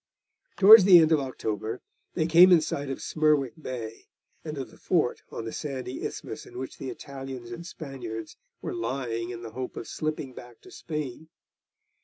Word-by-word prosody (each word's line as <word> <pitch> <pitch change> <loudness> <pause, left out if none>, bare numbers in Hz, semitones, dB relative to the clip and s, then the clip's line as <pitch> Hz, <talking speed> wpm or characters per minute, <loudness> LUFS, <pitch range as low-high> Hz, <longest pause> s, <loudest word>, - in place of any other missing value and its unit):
Towards 205 0 +10
the 185 -3 +9
end 160 -1 +5
of 155 - +5
October 115 -3 -4 0.4
they 160 - +1
came 170 +3 +7
in 175 - +8
sight 145 -2 -3
of 135 - -5
Smerwick 150 -5 +2
Bay, 115 -5 -7 0.4
and 155 -2 -6
of 135 - -6
the - - -17
fort 165 -9 +1
on 115 - -5
the 115 - -5
sandy 130 -3 -5
isthmus - - -6
in - - -11
which 130 +1 -7
the 135 - -5
Italians 135 -4 -8
and 170 +9 -7
Spaniards 120 -9 -7 0.3
were - - -3
lying 115 -1 -3
in 120 -1 -7
the 115 - -7
hope 130 +1 -6
of 115 - -6
slipping 155 -4 -4
back 120 -1 -12
to - - -15
Spain. 155 -1 -6
135 Hz, 180 wpm, -27 LUFS, 120-155 Hz, 0.4 s, Towards